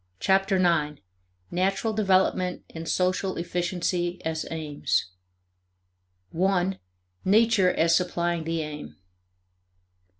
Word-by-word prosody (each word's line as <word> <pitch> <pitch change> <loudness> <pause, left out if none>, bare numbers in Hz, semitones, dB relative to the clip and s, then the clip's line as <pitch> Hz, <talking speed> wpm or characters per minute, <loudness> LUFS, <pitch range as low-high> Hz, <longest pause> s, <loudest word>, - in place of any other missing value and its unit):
Chapter 195 0 +2
Nine: 155 -5 +1 0.5
Natural 195 +5 0
Development 190 -3 +1
and 165 0 -6
Social 185 +1 0
Efficiency 175 0 -2
as 160 -1 -2
Aims 150 - -2 1.2
1. 190 +1 +1 0.4
Nature 210 -2 +4
as 165 +1 +3
Supplying 175 -2 0
the 165 0 -2
Aim. 150 -1 -8
180 Hz, 90 wpm, -26 LUFS, 165-190 Hz, 1.2 s, Nature